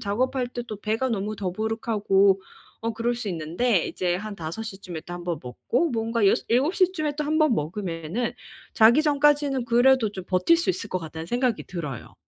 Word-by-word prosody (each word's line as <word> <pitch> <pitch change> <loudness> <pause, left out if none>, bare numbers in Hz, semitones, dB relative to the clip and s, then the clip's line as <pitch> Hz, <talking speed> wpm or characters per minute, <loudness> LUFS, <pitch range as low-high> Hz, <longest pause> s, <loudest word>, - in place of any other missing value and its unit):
작업할 250 +5 0
때 245 -1 -5
또 215 - -5
배가 220 +5 0
너무 215 -2 -2
더부룩하고 200 -1 +1 0.4
어 230 0 -1
그럴 230 +2 -1
수 235 -3 -4
있는데. 175 +5 0
이제 180 -1 -1
한 205 +2 -5
5 165 +7 -5
시쯤에 195 -6 -7
또 175 - -7
1 175 0 -6
번 170 -3 -2
먹고 245 - -1
뭔가 230 -2 0
여서 - - +1
7 265 +10 +2
시쯤에 350 -6 +1
또 300 - -1
1 310 +2 0
번 310 -4 +4
먹으면은 175 +5 -3 0.4
자기 230 +7 +6
전까지는 290 -3 +2
그래도 240 -1 +4
좀 190 - -6
버틸 185 - +3
수 340 +3 +1
있을 220 - -4
것 185 - -1
같다는 160 0 -7
생각이 240 +2 0
들어요. 150 - -6
220 Hz, 335 characters per minute, -25 LUFS, 185-255 Hz, 0.4 s, 자기